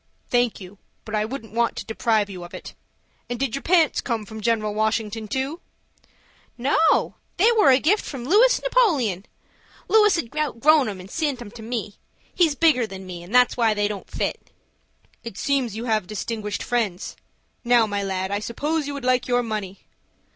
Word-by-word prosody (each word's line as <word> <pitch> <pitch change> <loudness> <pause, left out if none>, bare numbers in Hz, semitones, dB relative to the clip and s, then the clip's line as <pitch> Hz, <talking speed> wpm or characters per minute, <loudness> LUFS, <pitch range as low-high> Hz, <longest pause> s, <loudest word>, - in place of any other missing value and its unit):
"Thank 245 -2 +1
you, 190 +1 -12 0.3
but 215 - -8
I 215 0 +1
wouldn't 225 -3 -7
want 235 0 +1
to - - -6
deprive 220 -1 +1
you 185 -3 -8
of 175 - -10
it. - - -9 0.6
And 245 -1 -4
did 270 -5 -1
your 275 - -3
pants 335 -3 +3
come 230 -4 -3
from 220 +1 -9
General 215 -1 0
Washington 220 0 -1
too?" 270 - -3 1.0
"No, 275 +6 +2 0.2
they 430 +6 +5
was 415 - +5
a - - +2
gift 380 +10 +2
from 255 -4 -7
Lewis 440 - +5
Napoleon. 290 - +1 0.6
Lewis 420 -3 +5
had 300 -5 -4
outgrown 300 -1 +3
'em 195 -2 -7
and 185 +1 -11
sent 295 -5 -1
'em 230 -4 -9
to 225 - -11
me,—he's 240 - -3
bigger 280 -7 +3
than 190 -2 -9
me, 180 -2 -8
and 180 +8 -6
that's 250 0 +5
why 225 -3 +2
they 205 0 +1
don't 205 -2 -7
fit." - - -4 0.7
"It 230 -5 -8
seems 265 -6 0
you 225 +2 -5
have 215 -5 0
distinguished 210 0 -4
friends. 220 -7 -2 0.5
Now, 240 -1 +4
my 205 -1 -2
lad, 190 -1 -3
I 200 - 0
suppose 290 +8 -2
you 285 - -4
would 275 -3 -6
like 255 -1 +2
your 245 -1 +2
money." 210 -4 -5
235 Hz, 185 wpm, -23 LUFS, 210-280 Hz, 1.0 s, they